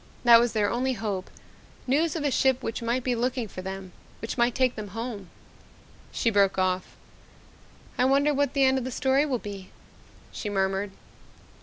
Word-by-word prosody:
That 235 -1 +8
was 240 0 +1
their 210 -2 +2
only 255 +2 0
hope 205 -5 -4 0.6
news 305 +5 +1
of 315 - -2
a 290 - +1
ship 260 -1 +2
which 225 - -3
might 235 +2 -1
be 250 - 0
looking 245 0 -1
for 185 - -8
them, 190 0 -7 0.3
which 225 - -5
might 240 -1 +2
take 255 -1 +2
them 215 -1 -6
home 225 -6 -5 0.4
" - - -26
She 230 - 0
broke 200 -2 +3
off. 185 0 -1 1.0
"I 250 - +4
wonder 280 +3 +3
what 285 -1 0
the 275 - +4
end 265 0 +4
of - - -5
the 255 - -4
story 265 +3 +1
will 260 -3 0
be?" 200 -4 -8 0.6
she 210 - -5
murmured. 195 0 0
235 Hz, 185 wpm, -26 LUFS, 205-260 Hz, 1.0 s, That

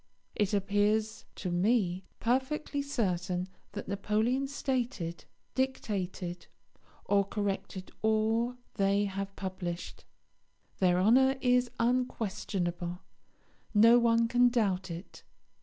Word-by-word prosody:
It 205 -2 0
appears 205 +2 +1
to 180 - -4
me 185 -1 +1
perfectly 265 +4 0
certain 185 -9 -1 0.3
that 205 - -6
Napoleon 215 +7 0
stated, 245 -11 -2 0.3
dictated, 190 -9 -2 0.6
or 200 0 +3
corrected 195 -2 -4
all 220 +3 +1 0.2
they 200 +1 +2
have 195 0 -4
published. 185 -2 -5 0.7
Their 180 -1 +3
honour 260 +7 +5
is 250 -1 +3
unquestionable; 190 -7 -1 0.7
no 230 +3 +7
one 230 -1 +3
can 245 +1 +4
doubt 200 -6 0
it. 170 +3 -8
205 Hz, 95 wpm, -31 LUFS, 185-240 Hz, 0.7 s, no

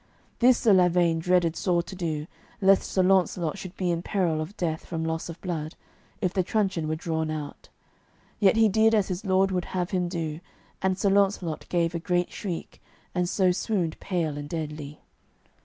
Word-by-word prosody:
This 250 0 +6
Sir 220 - +4
Lavaine 175 -2 +4
dreaded 175 -1 +2
sore 175 -2 +1
to 185 +3 -9
do, 160 -4 -3 0.3
lest 195 -1 +4
Sir 190 - +2
Launcelot 185 -2 +2
should 185 +1 -9
be 180 -2 0
in 170 0 -1
peril 175 -5 0
of 165 +7 -7
death 160 -3 -2
from 165 -2 -4
loss 160 +1 -3
of 170 - -8
blood, 160 -4 -4 0.5
if 185 -3 0
the 190 - +2
truncheon 190 -4 0
were 155 - -1
drawn 160 -1 -2
out. 155 -2 -6 0.7
Yet 200 -1 +5
he 225 0 +5
did 220 +2 +4
as 205 -3 +1
his 185 +1 -3
lord 190 0 +3
would 180 -2 -1
have 180 0 -1
him 180 -2 0
do, 165 -3 -3 0.4
and 190 -1 +1
Sir 200 0 +2
Launcelot 195 -5 +1
gave 170 -1 +1
a 170 - -2
great 175 +1 0
shriek, 180 -5 -6 0.3
and 180 -1 0
so 185 -2 +3
swooned 180 -3 -1
pale 160 -6 -2
and 145 0 -7
deadly. 150 -2 -5
175 Hz, 190 wpm, -26 LUFS, 160-190 Hz, 0.7 s, This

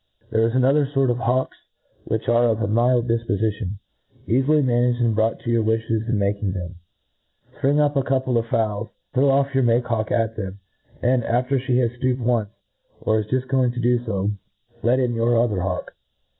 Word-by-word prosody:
There 110 0 +3
is 115 - -3
another 135 +3 +3
fort 135 -2 +1
of 120 - -2
hawks 130 +3 0 0.5
which 110 0 -3
are 120 +1 +4
of 115 -2 +1
a - - 0
mild 120 +3 +2
difpofition, 110 -3 -1 0.5
eafily 140 +5 +3
managed, 120 0 +1
and 115 -2 +2
brought 110 +1 0
to 120 - -3
your 115 -1 +2
wiflies 110 0 -1
in 115 - +1
making 100 -1 -1
them. 90 -1 -5 0.8
Spring 140 +2 +2
up 145 0 +2
a 135 - +3
cour 130 +1 +1
pie 130 - -4
of 115 - -4
fowls, 110 -1 -1 0.2
throw 135 +2 +3
off 135 +1 +2
your 135 - +2
make 120 0 +2
hawk 110 -2 -2
at 115 -1 0
them, 95 -2 -5 0.5
and, 125 0 +2
after 125 +4 0
flie 125 0 -1
has 120 -2 +2
fl:ooped 130 -1 +1
once, 115 -3 0 0.5
or 110 0 +1
is 105 - -4
juft 130 +2 -1
going 130 -2 +1
to 125 - -5
do 120 0 +1
fo, 100 -3 -1 0.5
let 125 +3 +2
in 125 -2 0
your 115 +1 +1
other 105 -6 +1
hawk. 90 0 -3
120 Hz, 200 wpm, -22 LUFS, 110-130 Hz, 0.8 s, are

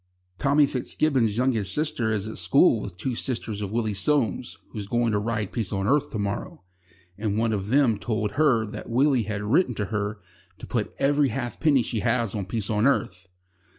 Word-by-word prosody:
Tommy 145 +1 +4
Fitzgibbon's 130 -4 0
youngest 115 -7 0
sister 145 -7 -1
is 105 -1 -1
at 110 - -6
school 110 - +4
with 95 -4 -7
two 130 +6 -2
sisters 115 -4 -3
of 100 -2 -4
Willie 110 -2 0
Soames, 120 +1 0
who's 105 -3 -6
going 120 +1 +1
to 105 - +1
ride 105 -2 -2
Peace 110 -6 -2
on 95 -1 -1
Earth 145 +2 +2
to - - -4
morrow, 100 -3 -4 0.6
and 105 -1 -1
one 115 0 +1
of 100 -2 -2
them 120 -3 +3
told 110 -1 -2
her 130 -6 +3
that 105 - -8
Willie 130 -1 +2
had 105 -1 -2
written 125 - +2
to 105 - -2
her 105 0 -2 0.4
to - - -9
put 110 -4 -2
every 145 0 +2
halfpenny 135 +2 +1
she 115 0 -2
has 115 0 0
on 100 -3 -3
Peace 110 +1 -2
on 105 +4 +3
Earth." 95 -9 -1
115 Hz, 190 wpm, -25 LUFS, 105-130 Hz, 0.6 s, Tommy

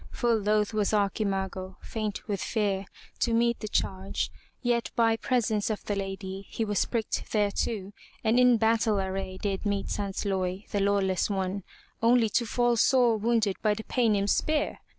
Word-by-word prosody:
Full 235 -2 +1
loath 210 +1 +1
was 210 -1 +1
Archimago, 195 -2 -1
faint 215 -2 -4
with 200 -3 -2
fear, 200 -3 -1 0.3
to 235 -1 +2
meet 235 0 +2
the 215 - -5
charge, 190 -2 -1 0.3
yet 240 -1 +1
by 225 -1 +4
presence 225 -3 0
of 215 - -3
the 205 - -1
lady, 195 0 -5
he 225 - -2
was 205 -2 +1
pricked 225 -3 -2
thereto 205 -1 -1 0.3
and 225 +2 +3
in 250 -1 +6
battle 220 -1 +2
array 190 0 -3
did 195 0 -2
meet 200 -2 -1
Sansloy, 195 -1 -2
the 205 - 0
lawless 195 -1 +1
one, 195 0 -1 0.4
only 230 -1 +4
to 235 +2 +1
fall 240 +1 +2
sore 245 -1 +4
wounded 220 -2 +1
by 210 -1 +2
the 220 - -6
Paynim's 210 -6 +1
spear. 310 -1 0
210 Hz, 160 wpm, -28 LUFS, 195-230 Hz, 0.4 s, in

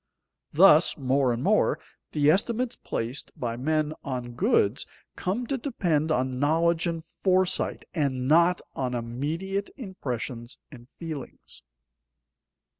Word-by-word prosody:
Thus, 165 -1 +6
more 135 -1 +2
and 120 +1 -2
more, - - +3 0.3
the 150 0 +4
estimates 235 +6 0
placed 120 +5 -4
by 115 -2 -2
men 155 +4 0
on 125 -3 -4
goods 120 0 +2 0.3
come 205 +7 -2
to 270 +2 -2
depend 170 - 0
on 130 -3 0
knowledge 165 +4 +2
and 165 -1 -3
foresight, 185 +1 0
and 130 -6 -1
not 170 +4 +4
on 125 -2 -2
immediate 155 - -3
impressions 125 - -5
and 120 -4 -13
feelings. 160 -5 -8
150 Hz, 115 wpm, -27 LUFS, 130-180 Hz, 0.3 s, Thus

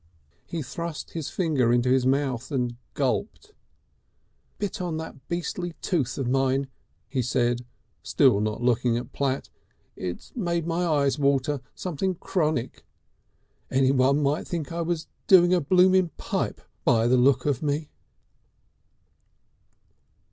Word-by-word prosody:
He 165 -3 -4
thrust 170 +4 -6
his 160 -4 -4
finger 150 -10 +1
into 120 +1 +2
his 130 -1 +3
mouth 130 -2 0
and 125 -3 -1 0.2
gulped. 200 - -2 1.1
"Bit 205 -3 -3
on 170 -3 -2
that 160 -5 -8
beastly 175 0 -3
tooth 135 -9 -1
of 135 - -2
mine," 135 +1 +1 0.4
he 130 +2 -1
said, 120 -1 0 0.4
still 130 -8 +3
not 110 +2 -2
looking 120 -1 +2
at 120 - -6
Platt. 135 -1 -2 0.4
"It's 90 -1 -6
made 170 -7 -1
my 170 +1 0
eyes 145 -3 +2
water, 140 0 +1
something 185 +1 -2
chronic. 155 -8 -1 0.9
Any 130 0 +3
one 135 +2 +3
might 145 +3 0
think 165 -4 -4
I'd 170 0 -2
been 175 -1 +1 0.3
doing 180 -2 +7
a 180 - +3
blooming 185 +3 +4
Pipe, - - -2 0.2
by 115 -1 +3
the 125 +2 +4
look 130 +2 +3
of 145 -4 0
me." 150 0 -2
140 Hz, 135 wpm, -26 LUFS, 130-170 Hz, 1.1 s, doing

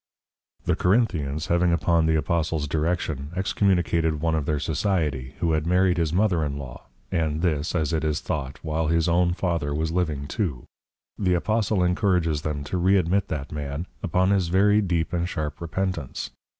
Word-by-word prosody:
_ - - -36
The - - +2
Corinthians, 85 - +1
having 85 -1 +2
upon 85 0 +2
the 80 - +3
Apostles 80 -1 0
Direction, 80 -2 -1
Excommunicated 85 -5 +1
one 80 +1 0
of 80 -3 -1
their 75 - +1
Society, 75 -5 -1
who 85 -2 +1
had 80 0 0
married 90 0 +3
his 80 -3 +1
Mother 90 -3 +2
in 70 -1 -2
law, 65 -3 -9
& - - -37
this, 80 -1 0
as 80 -1 0
it 80 -1 0
is 75 -1 0
thought, 70 -3 -4
while 80 0 -1
his 80 +1 +2
own 85 +1 +2
Father 85 -6 -1
was 80 +1 -1
Living 80 -5 -1
too; 80 - -2 0.6
the 90 -3 +2
Apostle 105 +1 +1
encourages 90 -4 +1
them 75 -2 -3
to 90 +5 -3
Re 95 +3 +4
admit 95 +2 +1
that 75 -2 -4
man, 75 +2 -4 0.2
upon 90 +3 +2
his 95 -4 +2
very 105 +4 +4
deep 85 -4 -1
and 85 0 0
sharp 75 -4 -4
Repentance. 85 -4 -3
85 Hz, 175 wpm, -25 LUFS, 75-90 Hz, 0.6 s, Re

